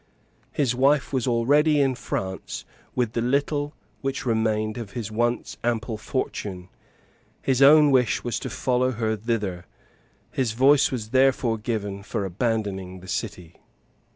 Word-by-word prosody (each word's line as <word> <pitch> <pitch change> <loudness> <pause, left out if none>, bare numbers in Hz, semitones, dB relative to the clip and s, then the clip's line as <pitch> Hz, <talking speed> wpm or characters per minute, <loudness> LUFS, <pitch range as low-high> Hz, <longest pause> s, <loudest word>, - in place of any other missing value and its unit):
His 130 -5 +1
wife 140 +3 +2
was 130 -2 0
already 145 +6 +3
in 135 -2 +3
France 95 -6 -5 0.3
with 120 -3 0
the 115 - 0
little 145 +4 0 0.3
which 135 0 -3
remained 110 -1 0
of 105 -4 -7
his 110 -3 -4
once 120 +2 -1
ample 115 -1 -1
fortune: 100 -5 -4 0.7
his 135 -1 +1
own 150 +1 +8
wish 125 -4 +2
was 120 - -2
to - - -5
follow 130 0 0
her 110 -1 -1
thither: 105 -5 -2 0.7
his 125 -5 -1
voice 135 +4 +4
was 115 -4 -4
therefore 130 -3 +3
given 105 -3 -3
for 100 0 -3
abandoning 95 -2 -2
the 95 - -12
city. 90 -3 -5
115 Hz, 140 wpm, -25 LUFS, 105-130 Hz, 0.7 s, own